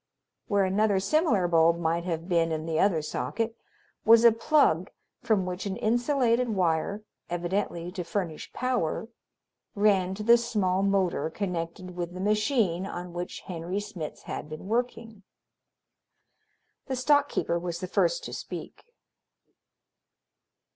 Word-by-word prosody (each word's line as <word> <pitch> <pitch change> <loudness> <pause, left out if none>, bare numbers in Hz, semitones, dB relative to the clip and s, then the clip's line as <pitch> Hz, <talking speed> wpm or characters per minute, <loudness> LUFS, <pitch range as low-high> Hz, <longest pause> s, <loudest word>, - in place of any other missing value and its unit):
Where 200 -1 +2
another 200 +1 +2
similar 210 - +2
bulb 165 0 +4
might 170 0 -1
have 165 -1 -3
been 165 -3 +2
in 155 0 -2
the 160 -1 -1
other 170 -6 +2
socket 225 +8 -2 0.5
was 230 +1 +7
a 235 - +9
plug 225 - +2 0.3
from 215 -6 +1
which 180 +2 -4
an 190 - -3
insulated 245 +1 +2
wire, 185 +1 0 0.3
evidently 175 0 -2
to 180 -1 -4
furnish 170 -3 -4
power, 235 -4 -1 0.7
ran 195 -3 +2
to 210 - -5
the 235 +2 +7
small 205 -6 0
motor 195 -4 +1
connected 180 -1 -4
with 175 0 -4
the - - -6
machine 210 -3 +1
on 180 -2 -6
which 175 +1 -5
Henry 180 +1 -4
Smitz 175 -6 -7
had - - -6
been 155 +3 -8
working. 230 -2 -2 1.7
The 265 - -2
stock 285 +3 +3
keeper 170 - -1
was 170 -1 -4
the 185 - -3
first - - +1
to - - -6
speak. - - -7
190 Hz, 135 wpm, -27 LUFS, 170-225 Hz, 1.7 s, a